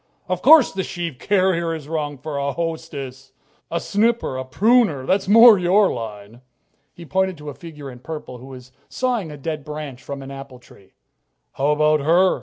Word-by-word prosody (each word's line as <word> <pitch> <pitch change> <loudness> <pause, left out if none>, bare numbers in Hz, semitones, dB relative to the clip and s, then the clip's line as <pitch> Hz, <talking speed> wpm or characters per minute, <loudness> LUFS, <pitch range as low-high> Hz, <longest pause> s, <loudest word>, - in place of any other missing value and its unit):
Of 185 -1 -2
course 305 -2 +7
the 195 - -3
sheave 170 -8 -5
carrier 185 -4 +1
is 150 -3 -9
wrong 150 -2 -3
for 145 +2 -6
a 140 0 -2
hostess! 140 -5 -6 0.4
A 170 - -1
snipper, 225 - 0
a 130 - -3
pruner 190 - +2
that's 190 +5 0
more 225 0 +8
your 190 +3 +3
line." 110 0 -8 0.5
He 170 - -12
pointed 190 +1 -1
to 150 0 -8
a - - -10
figure 150 -3 -10
in 125 - -12
purple 130 -3 -8
who 130 - -12
was 130 -1 -12 0.2
sawing 245 -9 -2
a 150 - -9
dead 155 +1 -5
branch 150 -3 -7
from 140 -1 -7
an 135 - -9
apple 135 -1 -10
tree. 110 -5 -21 0.6
"How 135 - -2
about 150 0 +3
her?" 170 +6 +3
155 Hz, 185 wpm, -21 LUFS, 135-185 Hz, 0.6 s, more